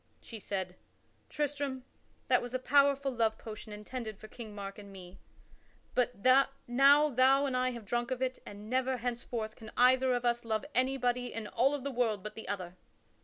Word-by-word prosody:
She 225 Hz, -, -9 dB
said: 190 Hz, -3 st, -4 dB, 0.5 s
"Tristram, 285 Hz, -3 st, -2 dB, 0.4 s
that 250 Hz, -1 st, +4 dB
was 245 Hz, +1 st, -5 dB
a -, -, +3 dB
powerful 280 Hz, +1 st, +3 dB
love 225 Hz, -3 st, +1 dB
potion 215 Hz, -1 st, -9 dB
intended 215 Hz, +1 st, -6 dB
for 215 Hz, -, -11 dB
King 215 Hz, -2 st, -10 dB
Mark 200 Hz, 0 st, -7 dB
and 200 Hz, -1 st, -11 dB
me. 185 Hz, -1 st, -12 dB, 0.7 s
But 245 Hz, -4 st, 0 dB, 0.4 s
now 280 Hz, +5 st, +6 dB
thou 265 Hz, +3 st, +4 dB
and 265 Hz, -2 st, -1 dB
I 255 Hz, 0 st, +2 dB
have 235 Hz, -4 st, -7 dB
drunk 240 Hz, +3 st, -1 dB
of 255 Hz, -1 st, -2 dB
it 260 Hz, 0 st, -2 dB
and 205 Hz, +1 st, -10 dB
never 260 Hz, +2 st, 0 dB
henceforth 235 Hz, -2 st, -4 dB
can 220 Hz, -1 st, -11 dB
either 255 Hz, +1 st, +5 dB
of 245 Hz, 0 st, -2 dB
us 240 Hz, 0 st, +1 dB
love 220 Hz, +2 st, -2 dB
anybody 250 Hz, -1 st, +1 dB
in 225 Hz, -1 st, -5 dB
all 260 Hz, +7 st, +2 dB
of 280 Hz, -, -6 dB
the 280 Hz, -, -3 dB
world 225 Hz, -6 st, 0 dB
but 215 Hz, -, -6 dB
the 225 Hz, -, -9 dB
other." 180 Hz, -3 st, -5 dB
245 Hz, 185 wpm, -32 LUFS, 215-260 Hz, 0.7 s, now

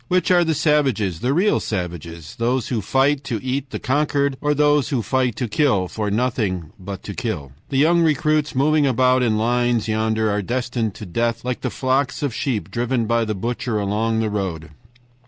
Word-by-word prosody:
Which 185 Hz, -1 st, +1 dB
are 175 Hz, -1 st, +5 dB
the 160 Hz, -2 st, 0 dB
savages, 135 Hz, -, +1 dB
the 125 Hz, -, 0 dB
real 185 Hz, +8 st, +3 dB
savages? 85 Hz, -5 st, -5 dB
Those 120 Hz, +1 st, 0 dB
who 115 Hz, -4 st, -1 dB
fight 135 Hz, +6 st, +1 dB
to 115 Hz, -5 st, -2 dB
eat 135 Hz, +1 st, -2 dB
the -, -, -4 dB
conquered, 140 Hz, 0 st, 0 dB
or 150 Hz, 0 st, +1 dB
those 145 Hz, -3 st, +3 dB
who 125 Hz, -5 st, 0 dB
fight 130 Hz, -3 st, 0 dB
to 125 Hz, -, -2 dB
kill, 105 Hz, -5 st, +1 dB
for 105 Hz, +2 st, -3 dB
nothing 105 Hz, -, -1 dB
but 95 Hz, 0 st, -7 dB
to -, -, -6 dB
kill? 70 Hz, -2 st, -4 dB, 0.2 s
"The 135 Hz, -, -1 dB
young 170 Hz, +5 st, +4 dB
recruits, 155 Hz, -1 st, +1 dB
moving 150 Hz, +2 st, +3 dB
about 130 Hz, 0 st, +3 dB
in 110 Hz, -3 st, +2 dB
lines 120 Hz, 0 st, +1 dB
yonder, 110 Hz, 0 st, 0 dB
are 105 Hz, 0 st, 0 dB
destined 120 Hz, -1 st, -2 dB
to 105 Hz, -, -8 dB
death 115 Hz, +5 st, -1 dB
like 125 Hz, -1 st, -2 dB
the -, -, -1 dB
flocks 135 Hz, +2 st, 0 dB
of 140 Hz, -5 st, -1 dB
sheep 105 Hz, -, -2 dB
driven 120 Hz, +1 st, 0 dB
by 115 Hz, +1 st, +1 dB
the 110 Hz, -1 st, -2 dB
butcher 115 Hz, +2 st, -2 dB
along 110 Hz, +2 st, 0 dB
the 110 Hz, -1 st, -1 dB
road. 85 Hz, -6 st, -3 dB
120 Hz, 190 wpm, -21 LUFS, 105-140 Hz, 0.2 s, are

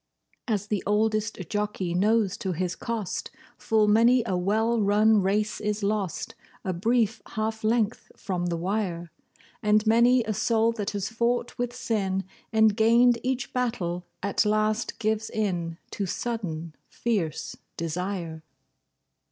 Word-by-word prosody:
As 210 Hz, -4 st, 0 dB
the 210 Hz, -2 st, -1 dB
oldest 215 Hz, +1 st, +1 dB
jockey 205 Hz, -3 st, -2 dB
knows 205 Hz, +1 st, +2 dB
to 190 Hz, -2 st, -2 dB
his 180 Hz, +1 st, -2 dB
cost, 225 Hz, -5 st, -3 dB, 0.3 s
Full 220 Hz, -1 st, +2 dB
many 230 Hz, +3 st, +5 dB
a 190 Hz, -, -1 dB
well 220 Hz, +5 st, +1 dB
run 210 Hz, +1 st, +4 dB
race 210 Hz, +3 st, 0 dB
is 210 Hz, 0 st, -2 dB
lost 200 Hz, -3 st, -1 dB, 0.3 s
A 185 Hz, -, 0 dB
brief 225 Hz, +4 st, +1 dB, 0.2 s
half 220 Hz, +1 st, -2 dB
length 220 Hz, 0 st, 0 dB
from 180 Hz, -2 st, -2 dB
the 170 Hz, -1 st, -1 dB
wire. 175 Hz, -2 st, -2 dB, 0.5 s
And 210 Hz, +1 st, +3 dB
many 235 Hz, +3 st, +5 dB
a 215 Hz, -, -2 dB
soul 225 Hz, +2 st, +2 dB
that 210 Hz, -3 st, -3 dB
has 200 Hz, -1 st, -3 dB
fought 235 Hz, +2 st, 0 dB
with 245 Hz, 0 st, -2 dB
sin, 195 Hz, -6 st, -1 dB, 0.3 s
And 220 Hz, -2 st, +4 dB
gained 235 Hz, +2 st, +5 dB
each 255 Hz, 0 st, -2 dB
battle, 180 Hz, -9 st, -2 dB, 0.2 s
at 200 Hz, -1 st, +2 dB
last 215 Hz, +1 st, 0 dB
gives 220 Hz, 0 st, -1 dB
in 175 Hz, -6 st, -2 dB
To 200 Hz, -, -3 dB
sudden, 170 Hz, -8 st, -3 dB, 0.2 s
fierce 195 Hz, -10 st, -2 dB, 0.2 s
desire. 170 Hz, 0 st, -3 dB
210 Hz, 135 wpm, -26 LUFS, 190-225 Hz, 0.5 s, many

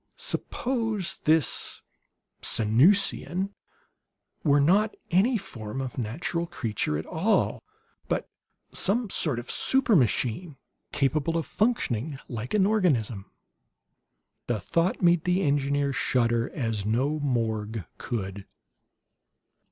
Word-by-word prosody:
Suppose 225 Hz, -7 st, -2 dB
this 155 Hz, -1 st, +1 dB, 0.6 s
Sanusian 180 Hz, -, +3 dB, 0.9 s
were 145 Hz, -2 st, +4 dB
not 200 Hz, +9 st, +3 dB, 0.2 s
any 215 Hz, +8 st, +3 dB
form 110 Hz, -, -7 dB
of 130 Hz, -1 st, -4 dB
natural 170 Hz, +9 st, -2 dB
creature 110 Hz, -, -2 dB
at 80 Hz, -, -5 dB
all, 190 Hz, +8 st, +1 dB, 0.5 s
but -, -, -1 dB, 0.4 s
some 215 Hz, +1 st, +1 dB
sort 145 Hz, -7 st, +1 dB
of 120 Hz, -, -5 dB
supermachine, 165 Hz, -, +2 dB, 0.4 s
capable 150 Hz, +3 st, 0 dB
of 165 Hz, -, -2 dB
functioning 155 Hz, -, -1 dB
like 120 Hz, -, -4 dB
an 195 Hz, -2 st, +4 dB
organism? 130 Hz, -, +1 dB, 1.2 s
The 120 Hz, -3 st, 0 dB
thought 165 Hz, -, 0 dB
made 175 Hz, -2 st, +4 dB
the 180 Hz, +2 st, +1 dB
engineer 140 Hz, -1 st, +1 dB
shudder 120 Hz, -3 st, +1 dB
as 115 Hz, -6 st, -2 dB
no 130 Hz, +9 st, 0 dB
morgue 110 Hz, -, -2 dB
could. 100 Hz, -4 st, -5 dB
145 Hz, 100 wpm, -27 LUFS, 115-180 Hz, 1.2 s, were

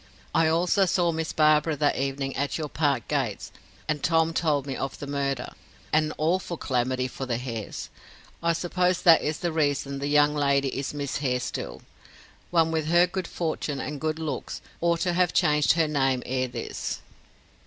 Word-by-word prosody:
I 165 Hz, -, +4 dB
also 180 Hz, +4 st, +3 dB
saw 175 Hz, -1 st, +2 dB
Miss 160 Hz, 0 st, -3 dB
Barbara 155 Hz, 0 st, +3 dB
that 145 Hz, 0 st, +1 dB
evening 135 Hz, 0 st, -2 dB
at 140 Hz, +1 st, -1 dB
your 155 Hz, -2 st, -4 dB
park 140 Hz, -6 st, 0 dB
gates, 130 Hz, -9 st, -2 dB, 0.4 s
and 150 Hz, -2 st, -1 dB
Tom 165 Hz, -1 st, +2 dB
told 150 Hz, -5 st, +1 dB
me 135 Hz, -2 st, -4 dB
of 135 Hz, -, -4 dB
the -, -, -6 dB
murder. 140 Hz, -2 st, -2 dB, 0.4 s
An 155 Hz, 0 st, +3 dB
awful 170 Hz, +2 st, 0 dB
calamity 130 Hz, -1 st, 0 dB
for 130 Hz, +1 st, -6 dB
the 120 Hz, -2 st, 0 dB
Hares. 115 Hz, -4 st, -6 dB, 0.5 s
I 170 Hz, 0 st, +2 dB
suppose 180 Hz, +1 st, 0 dB
that 165 Hz, -2 st, +7 dB
is 150 Hz, 0 st, -1 dB
the 175 Hz, -, 0 dB
reason 145 Hz, -3 st, 0 dB
the 140 Hz, -, -2 dB
young 145 Hz, 0 st, +4 dB
lady 140 Hz, -2 st, +2 dB
is 135 Hz, +2 st, -4 dB
Miss 140 Hz, -2 st, -2 dB
Hare 130 Hz, -3 st, 0 dB
still. 125 Hz, -, -5 dB, 0.7 s
One 165 Hz, -2 st, +3 dB
with 160 Hz, -2 st, -1 dB
her 175 Hz, +2 st, +5 dB
good 180 Hz, 0 st, -4 dB
fortune 155 Hz, -4 st, -3 dB
and 150 Hz, 0 st, -5 dB
good 155 Hz, 0 st, -1 dB
looks 160 Hz, -2 st, -4 dB, 0.2 s
ought 170 Hz, 0 st, +2 dB
to 175 Hz, -1 st, +1 dB
have 180 Hz, 0 st, +2 dB
changed 150 Hz, -4 st, +4 dB
her 165 Hz, -1 st, +2 dB
name 135 Hz, -4 st, +1 dB
ere 130 Hz, 0 st, -1 dB
this." 120 Hz, -1 st, -5 dB
150 Hz, 180 wpm, -26 LUFS, 135-165 Hz, 0.7 s, that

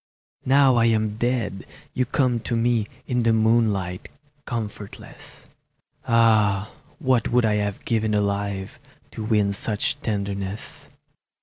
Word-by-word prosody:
Now 135 Hz, -2 st, +5 dB
I 115 Hz, -, +4 dB
am 110 Hz, -2 st, +1 dB
dead 120 Hz, -5 st, -2 dB, 0.3 s
you 130 Hz, -, 0 dB
come 125 Hz, -3 st, +1 dB
to 115 Hz, +1 st, -2 dB
me 115 Hz, -2 st, +1 dB, 0.2 s
In 125 Hz, -1 st, 0 dB
the 115 Hz, -1 st, +3 dB
moonlight, 110 Hz, -5 st, +1 dB, 0.4 s
comfortless; 105 Hz, -4 st, -8 dB, 0.6 s
Ah, 110 Hz, -3 st, +3 dB, 0.3 s
what 130 Hz, -8 st, +1 dB
would 120 Hz, -1 st, +3 dB
I 105 Hz, -1 st, +2 dB
have 105 Hz, -1 st, -3 dB
given 110 Hz, -2 st, 0 dB
alive 100 Hz, -1 st, -2 dB, 0.3 s
To 110 Hz, -, -6 dB
win 105 Hz, -2 st, +1 dB
such 115 Hz, +7 st, -1 dB
tenderness! 100 Hz, -2 st, -4 dB
110 Hz, 120 wpm, -23 LUFS, 100-120 Hz, 0.6 s, Now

